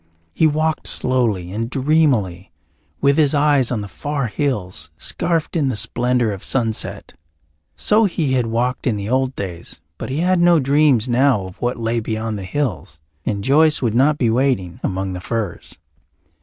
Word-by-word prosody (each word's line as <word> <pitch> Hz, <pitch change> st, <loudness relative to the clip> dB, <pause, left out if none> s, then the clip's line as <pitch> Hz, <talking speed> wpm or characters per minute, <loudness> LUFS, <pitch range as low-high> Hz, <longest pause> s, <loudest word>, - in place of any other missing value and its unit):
He 160 Hz, -, +3 dB
walked 155 Hz, +1 st, -1 dB
slowly 115 Hz, -9 st, 0 dB
and 115 Hz, +3 st, -3 dB
dreamily, 130 Hz, -, +1 dB, 0.5 s
with 140 Hz, 0 st, +3 dB
his 150 Hz, -2 st, +3 dB
eyes 145 Hz, -4 st, +3 dB
on 115 Hz, -4 st, -1 dB
the 100 Hz, -, -6 dB
far 145 Hz, +6 st, -3 dB
hills 100 Hz, -, -3 dB
scarfed 165 Hz, -, -1 dB
in 150 Hz, -4 st, +1 dB
the 130 Hz, -, -1 dB
splendour 120 Hz, +1 st, +1 dB
of 100 Hz, -2 st, -7 dB
sunset. 115 Hz, -4 st, -2 dB, 0.6 s
So 215 Hz, +1 st, +3 dB
he 160 Hz, -8 st, -1 dB
had 125 Hz, -3 st, +1 dB
walked 125 Hz, +4 st, -1 dB
in 115 Hz, -, +1 dB
the 100 Hz, 0 st, -5 dB
old 130 Hz, +1 st, 0 dB
days, 90 Hz, -4 st, -7 dB, 0.2 s
but -, -, -5 dB
he 140 Hz, +5 st, -2 dB
had 180 Hz, 0 st, +2 dB
no 175 Hz, -1 st, +5 dB
dreams 140 Hz, -3 st, +3 dB
now 125 Hz, -4 st, +2 dB
of 95 Hz, +1 st, -12 dB
what 120 Hz, 0 st, -1 dB
lay 115 Hz, 0 st, -1 dB
beyond 110 Hz, -1 st, -3 dB
the -, -, -6 dB
hills, 100 Hz, -, -3 dB, 0.3 s
and 100 Hz, -2 st, -2 dB
Joyce 150 Hz, +3 st, +3 dB
would 115 Hz, -3 st, +1 dB
not 140 Hz, +5 st, +3 dB
be 120 Hz, -5 st, +1 dB
waiting 115 Hz, -9 st, 0 dB
among 95 Hz, 0 st, -2 dB
the 90 Hz, -, -6 dB
firs. 110 Hz, -3 st, -5 dB
125 Hz, 170 wpm, -20 LUFS, 105-145 Hz, 0.6 s, no